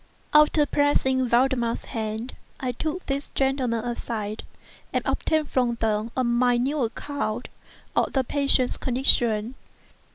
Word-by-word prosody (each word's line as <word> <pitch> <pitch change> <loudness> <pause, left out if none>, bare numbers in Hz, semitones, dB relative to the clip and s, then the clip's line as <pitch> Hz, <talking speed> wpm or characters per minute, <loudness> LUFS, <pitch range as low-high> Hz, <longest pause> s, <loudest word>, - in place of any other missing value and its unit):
After 300 0 +5
pressing 265 -3 +1
Valdemar's 240 -1 +1
hand, 220 +2 -4 0.2
I 255 -1 -2
took 315 +8 -4
these 280 +1 -3
gentlemen 260 -4 0
aside, 220 -3 -4 0.5
and - - -1
obtained 310 -2 0
from 245 -2 +1
them 220 -1 -1
a 255 - +2
minute 245 +4 +1
account 245 -1 -3 0.5
of - - +2
the 265 - +1
patient's 275 -1 +2
condition. 240 -3 +2
250 Hz, 120 wpm, -25 LUFS, 230-275 Hz, 0.5 s, After